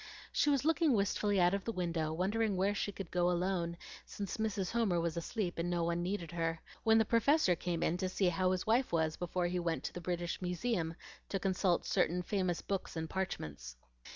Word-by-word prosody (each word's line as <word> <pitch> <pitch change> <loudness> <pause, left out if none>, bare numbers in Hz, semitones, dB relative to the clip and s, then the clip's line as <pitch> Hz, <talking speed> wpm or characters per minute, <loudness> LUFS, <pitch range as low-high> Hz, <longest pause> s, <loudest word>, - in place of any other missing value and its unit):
She - - +2
was 280 -1 +2
looking 325 -2 +3
wistfully 205 -1 +1
out 175 +1 +4
of 200 -1 -1
the 230 - -2
window 170 -5 -1
wondering 200 +4 0
where 195 +2 +2
she 205 0 -2
could 195 -3 -7
go 175 0 +2
alone, 175 -1 0 0.3
since 200 -3 -5
Mrs. 210 -4 -1
Homer 220 -7 +2
was 165 -1 -1
asleep 175 +1 -3
and 170 +1 0
no 175 -1 0
one 170 +1 0
needed 175 -2 -3
her, 165 -1 -1 0.2
when 225 0 +5
the 220 - +4
Professor 230 - +4
came 170 0 -2
in 170 - +1
to 185 0 -1
see 185 0 +2
how 185 +2 +1
his 185 0 0
wife 240 +4 +2
was 160 -2 +1
before 175 0 -2
he 180 +1 0
went 170 -1 -1
to - - -4
the 175 - -6
British 175 0 -2
Museum 180 -2 -1 0.3
to 195 - -1
consult 185 -1 +1
certain 180 +2 +1
famous 185 -2 -1
books 195 -3 -3
and 160 -1 -4
parchments. 75 - -4
180 Hz, 210 wpm, -34 LUFS, 170-205 Hz, 0.3 s, when